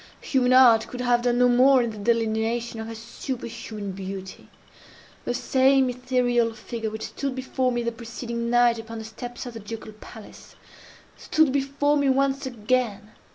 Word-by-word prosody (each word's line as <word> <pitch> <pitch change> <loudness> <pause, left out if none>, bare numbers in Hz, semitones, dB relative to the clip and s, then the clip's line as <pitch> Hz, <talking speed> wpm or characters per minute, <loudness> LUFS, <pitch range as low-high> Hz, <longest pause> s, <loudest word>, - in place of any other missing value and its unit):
Human 255 -2 +1
art 240 -4 +6
could 250 - -6
have 245 -1 +2
done 245 0 +1
no 250 0 +5
more 255 +1 +5
in 235 - -2
the 215 - -9
delineation 230 +1 0
of 220 - -5
her 225 - -7
superhuman 230 -3 -6
beauty. 190 0 -8 0.8
The 245 - -1
same 265 0 +3
ethereal 245 -2 0
figure 225 0 -5
which 220 0 -6
stood 275 -2 -4
before 260 0 -1
me 240 -1 -1
the 235 - -1
preceding 235 0 -5
night 240 -1 +4
upon 225 0 -8
the 220 - -7
steps 240 +3 -8
of 245 - -7
the 225 - -7
Ducal 220 +1 -8
Palace, 215 0 -13 0.6
stood 315 -3 +2
before 280 +2 +1
me 285 -1 +2
once 275 +1 +1
again. 220 -3 -1
240 Hz, 165 wpm, -25 LUFS, 225-255 Hz, 0.8 s, art